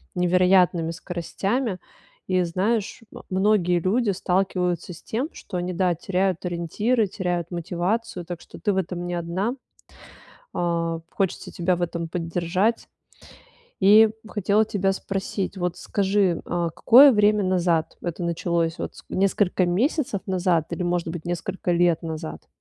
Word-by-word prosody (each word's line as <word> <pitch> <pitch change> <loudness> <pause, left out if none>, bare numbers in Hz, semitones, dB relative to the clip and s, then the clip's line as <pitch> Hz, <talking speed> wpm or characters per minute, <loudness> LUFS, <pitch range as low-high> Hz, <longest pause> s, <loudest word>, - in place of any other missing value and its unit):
невероятными 180 -2 +3
скоростями. 190 +6 -3 0.5
И, 185 -1 +2
знаешь, 195 +5 -1 0.3
многие 185 -3 +2
люди 210 +5 +1
сталкиваются 180 -2 -1
с 165 - -13
тем, 255 +8 -3
что 185 - -7
они, 180 +1 -2
да, 180 -1 +1
теряют 185 +1 -1
ориентиры, 200 +7 0
теряют 175 -3 -2
мотивацию. 180 +4 -2
Так 175 0 -6
что - - -13
ты 210 - +1
в - - -2
этом 175 -1 -3
не 175 - -2
одна. 180 +8 -2 1.0
А, 165 -1 -1
хочется 195 -3 -2
тебя 180 +1 0
в - - -6
этом 170 -1 -2
поддержать. 175 +5 -1 0.9
И 215 +3 +7 0.2
хотела 210 0 +1
тебя 195 -2 0
спросить, 195 0 -3
вот 180 -1 -2
скажи, 195 -3 +1
а 170 -1 -1
какое 260 - +7
время 210 -2 +3
назад 175 -3 +1
это 175 0 -4
началось? 170 -1 -1
Вот, - - -5
с - - -13
несколько 190 -1 +1
месяцев 215 - 0
назад 180 -4 +1
или, 170 +1 -2
может 175 -1 -1
быть, 165 0 -6
несколько 175 +1 -3
лет 175 -1 +3
назад? 160 -1 -6
180 Hz, 140 wpm, -24 LUFS, 170-195 Hz, 1.0 s, И